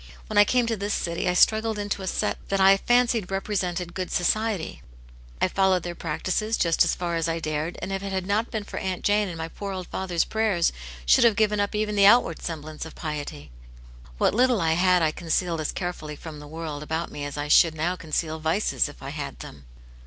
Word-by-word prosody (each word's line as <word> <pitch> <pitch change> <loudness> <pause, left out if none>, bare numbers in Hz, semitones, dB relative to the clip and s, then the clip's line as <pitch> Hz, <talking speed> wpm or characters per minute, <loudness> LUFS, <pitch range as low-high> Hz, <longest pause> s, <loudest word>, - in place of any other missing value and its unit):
When 210 -1 +1
I 205 - +8
came 245 +2 +2
to 230 -1 -1
this 205 0 -2
city, 170 +1 -1
I 180 - 0
struggled 220 +3 +3
into 205 -1 -3
a 190 - -5
set - - -1
that 195 - +1
I 195 +1 +7
fancied 240 -3 +2
represented 185 -3 -2
good 185 -1 -4
society; 210 0 0 0.6
I - - +3
followed 190 -1 +2
their 175 - -4
practices 185 +7 -2
just 165 -1 +3
as - - +1
far 170 -1 -2
as 165 0 -1
I 165 - -1
dared, 155 +1 -3
and 195 - -4
if 195 0 -2
it 200 0 -5
had 190 -1 -2
not 210 +4 0
been 220 -3 -3
for - - -6
Aunt 185 -1 -3
Jane 205 0 +2
and 175 -3 -6
my 160 0 -4
poor 195 +4 -6
old 185 -1 -5
father's 180 -3 -1
prayers, 215 -6 +1 0.3
should - - +5
have 230 -3 +5
given 210 -1 +2
up 205 +1 -1
even 210 0 0
the 200 -1 +6
outward 210 -7 +4
semblance 155 -2 -6
of 160 - -10
piety. 145 - -6 0.7
What - - +2
little 245 0 +3
I 160 -2 +2
had 180 0 +3
I 155 - +3
concealed 165 0 -1
as 155 - -2
carefully 175 -4 -5
from 155 0 -9
the 150 - -10
world 155 -1 -6
about 160 +2 -3
me 145 - -6
as 145 0 -5
I 145 0 -3
should 160 +2 +5
now 170 +4 -1
conceal 160 -1 -3
vices, 160 +1 +1
if 145 - -14
I 135 - -5
had 140 -3 -6
them." 70 -1 -11
180 Hz, 225 wpm, -25 LUFS, 160-205 Hz, 0.7 s, I